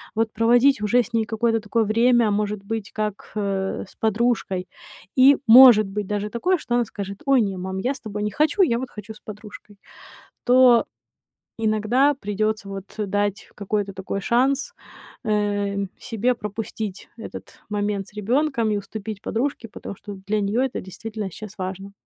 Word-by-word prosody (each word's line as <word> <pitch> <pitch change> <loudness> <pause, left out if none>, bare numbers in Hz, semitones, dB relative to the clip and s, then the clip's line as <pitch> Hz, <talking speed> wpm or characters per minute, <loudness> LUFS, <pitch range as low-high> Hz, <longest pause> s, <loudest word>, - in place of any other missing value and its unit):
вот 220 0 +1
проводить 240 +3 +4
уже 210 +3 +2
с 240 0 -2
ней 225 -1 +1
какое-то 225 +1 0
такое 225 +1 0
время, 230 +1 +3
может 210 0 -1
быть, 220 -1 -4
как, 210 -2 -4
э, 195 -2 -2
с 190 - -12
подружкой. 220 -4 0 0.5
И 270 +2 +8
может 230 -3 +9
быть 205 +1 -4
даже 205 +1 -2
такое, 360 - +1
что 240 -6 -2
она 240 -1 +2
скажет: 200 -1 -7
"Ой, 275 -3 +4
не, 195 -3 -2
мам, 190 +1 -4
я 245 +7 0
с 280 - -6
тобой 210 -2 -5
не 210 - -1
хочу, 315 - +3
я 235 -9 +2
вот 260 -1 -6
хочу 210 +1 -9
с 215 - -16
подружкой", 210 -1 -11 0.7
то 250 -2 +6 0.8
иногда 220 +6 +3
придётся, 215 -3 -2
вот, 195 0 -8
дать 205 +1 -1
какой-то 205 -1 -2
такой 190 +1 -4
шанс, 265 +6 +1 0.5
э, 205 -2 0
мь 200 -1 -2
себе 235 +2 0
пропустить 210 -2 -6
этот 225 - -9
момент 205 -1 -2
с 210 - -17
ребёнком, 245 0 +1
и 210 - +1
уступить 205 0 -6
подружке, 240 0 -2
потому 210 -2 -8
что 200 +1 -9
для 215 +1 +1
неё 205 +4 0
это 265 -2 -3
действительно 215 +2 -6
щас 210 +3 -10
важно. 190 +1 -5
215 Hz, 170 wpm, -23 LUFS, 205-235 Hz, 0.8 s, может